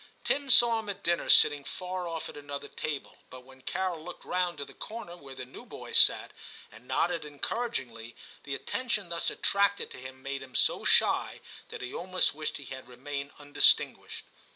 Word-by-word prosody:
Tim 285 Hz, -1 st, 0 dB
saw 235 Hz, -2 st, +6 dB
him 215 Hz, -2 st, -7 dB
at 200 Hz, -, -5 dB
dinner 170 Hz, 0 st, +1 dB
sitting 145 Hz, -1 st, +7 dB
far 180 Hz, +3 st, -4 dB
off 165 Hz, -1 st, -4 dB
at -, -, -10 dB
another 145 Hz, -1 st, -6 dB
table, 150 Hz, -3 st, -5 dB
but 130 Hz, 0 st, -11 dB
when 130 Hz, 0 st, -16 dB
Carol 175 Hz, +2 st, -2 dB
looked 175 Hz, +1 st, -9 dB
round 180 Hz, -2 st, 0 dB
to 140 Hz, -, -4 dB
the -, -, -14 dB
corner 215 Hz, -6 st, -7 dB
where 140 Hz, -6 st, -11 dB
the 130 Hz, -1 st, -6 dB
new 125 Hz, -, -11 dB
boys -, -, +1 dB
sat, -, -, +5 dB, 0.4 s
and 115 Hz, +4 st, -15 dB
nodded 170 Hz, -1 st, +1 dB
encouragingly, 140 Hz, -, -4 dB, 0.3 s
the 140 Hz, -1 st, -3 dB
attention 215 Hz, -, -2 dB
thus 170 Hz, 0 st, 0 dB
attracted 200 Hz, 0 st, +1 dB
to -, -, -9 dB
him 130 Hz, +1 st, -10 dB
made 140 Hz, 0 st, -3 dB
him 130 Hz, -1 st, -12 dB
so -, -, +2 dB
shy, -, -, +3 dB, 0.3 s
that -, -, -7 dB
he 125 Hz, -, -5 dB
almost 185 Hz, +1 st, +1 dB
wished 155 Hz, +1 st, -3 dB
he 145 Hz, -, -10 dB
had 130 Hz, -1 st, -8 dB
remained 140 Hz, +3 st, -5 dB
undistin 145 Hz, -1 st, +4 dB
guished. -, -, -10 dB
150 Hz, 190 wpm, -30 LUFS, 135-185 Hz, 0.4 s, sitting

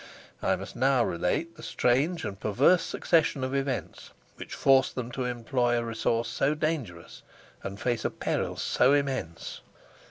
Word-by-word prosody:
I -, -, +2 dB
must -, -, -8 dB
now 130 Hz, -1 st, +3 dB
relate 90 Hz, -, -1 dB
the -, -, -11 dB
strange 145 Hz, +9 st, +1 dB
and 100 Hz, -1 st, -5 dB
perverse 135 Hz, -, +4 dB
succession 160 Hz, -5 st, +1 dB
of 130 Hz, +1 st, -2 dB
events 135 Hz, -2 st, -3 dB, 0.3 s
which -, -, -7 dB
forced 135 Hz, -1 st, +4 dB
them 125 Hz, -1 st, -4 dB
to 125 Hz, +1 st, -3 dB
employ 120 Hz, 0 st, 0 dB
a 120 Hz, -, 0 dB
resource 115 Hz, 0 st, -1 dB
so 145 Hz, +3 st, 0 dB
dangerous 145 Hz, -, -3 dB, 0.4 s
and 100 Hz, +1 st, -6 dB
face 120 Hz, -2 st, -1 dB
a -, -, +1 dB
peril -, -, -2 dB
so 135 Hz, -, +3 dB
immense. 135 Hz, -, -2 dB
125 Hz, 155 wpm, -28 LUFS, 115-140 Hz, 0.4 s, perverse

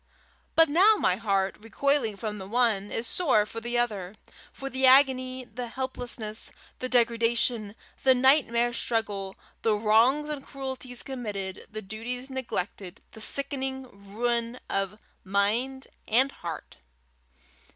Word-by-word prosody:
But 325 Hz, 0 st, +7 dB
now 375 Hz, +9 st, +6 dB
my -, -, +2 dB
heart, 195 Hz, -3 st, 0 dB
recoiling 225 Hz, 0 st, 0 dB
from 210 Hz, -1 st, -4 dB
the 190 Hz, -, -7 dB
one, 220 Hz, -3 st, +1 dB
is 225 Hz, -, -1 dB
sore 245 Hz, -6 st, +3 dB
for 225 Hz, +2 st, -7 dB
the 240 Hz, +1 st, -2 dB
other 210 Hz, -5 st, -1 dB, 0.4 s
for 275 Hz, -, -7 dB
the 265 Hz, 0 st, +2 dB
agony, 255 Hz, -1 st, +4 dB
the 240 Hz, +1 st, -6 dB
helplessness, 240 Hz, -3 st, -4 dB, 0.3 s
the 255 Hz, -, -3 dB
degradation, 230 Hz, -2 st, +2 dB, 0.3 s
the 260 Hz, -1 st, +5 dB
nightmare 250 Hz, -2 st, +3 dB
struggle, 205 Hz, -5 st, -2 dB, 0.3 s
the 220 Hz, -2 st, +2 dB
wrongs 230 Hz, +8 st, +3 dB
and 295 Hz, -3 st, -4 dB
cruelties 265 Hz, -3 st, -5 dB
committed, 205 Hz, -8 st, -5 dB
the 215 Hz, 0 st, -6 dB
duties 245 Hz, +6 st, -5 dB
neglected, 205 Hz, -6 st, -4 dB
the 220 Hz, -, -11 dB
sickening 265 Hz, +1 st, -1 dB, 0.3 s
ruin 235 Hz, +2 st, -1 dB
of 195 Hz, +1 st, -1 dB, 0.3 s
mind 220 Hz, +8 st, 0 dB, 0.2 s
and 260 Hz, +5 st, +3 dB
heart. 170 Hz, -8 st, -8 dB
235 Hz, 130 wpm, -27 LUFS, 210-265 Hz, 0.4 s, But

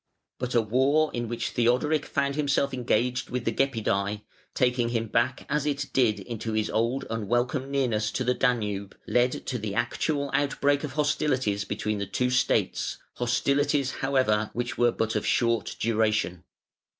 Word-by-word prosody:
But 125 Hz, 0 st, -3 dB
a 120 Hz, -, +5 dB
war 135 Hz, +8 st, +2 dB
in 120 Hz, -1 st, -2 dB
which 120 Hz, +1 st, -3 dB
Theodoric 125 Hz, +6 st, +1 dB
found 140 Hz, -1 st, 0 dB
himself 140 Hz, -2 st, +1 dB
engaged 125 Hz, 0 st, 0 dB
with 125 Hz, -1 st, -3 dB
the -, -, +2 dB
Gepidæ 125 Hz, -2 st, 0 dB
(504), 100 Hz, +1 st, -2 dB, 0.3 s
taking 125 Hz, -2 st, +2 dB
him 115 Hz, -1 st, -1 dB
back 120 Hz, +4 st, 0 dB
as 150 Hz, 0 st, 0 dB
it 140 Hz, -1 st, -2 dB
did 110 Hz, -6 st, +3 dB
into 110 Hz, +1 st, -5 dB
his 110 Hz, 0 st, 0 dB
old 115 Hz, +4 st, 0 dB
unwelcome 120 Hz, +5 st, -1 dB
nearness 120 Hz, -6 st, 0 dB
to 130 Hz, -, -1 dB
the 125 Hz, 0 st, +2 dB
Danube, 105 Hz, -6 st, -1 dB
led 125 Hz, +1 st, +1 dB
to 125 Hz, -2 st, -2 dB
the 105 Hz, -2 st, -4 dB
actual 140 Hz, +4 st, -1 dB
outbreak 145 Hz, 0 st, +1 dB
of 145 Hz, -3 st, -4 dB
hostilities 130 Hz, -8 st, 0 dB
between 105 Hz, -1 st, -2 dB
the 100 Hz, -, -3 dB
two 125 Hz, +6 st, 0 dB
States, 130 Hz, -, +1 dB, 0.2 s
hostilities, 140 Hz, +3 st, +1 dB
however, 130 Hz, -6 st, +1 dB
which 120 Hz, 0 st, -3 dB
were 120 Hz, 0 st, +3 dB
but 110 Hz, -1 st, -2 dB
of 105 Hz, -, 0 dB
short 115 Hz, -3 st, +1 dB
duration. 105 Hz, -6 st, 0 dB
120 Hz, 160 wpm, -27 LUFS, 110-135 Hz, 0.3 s, a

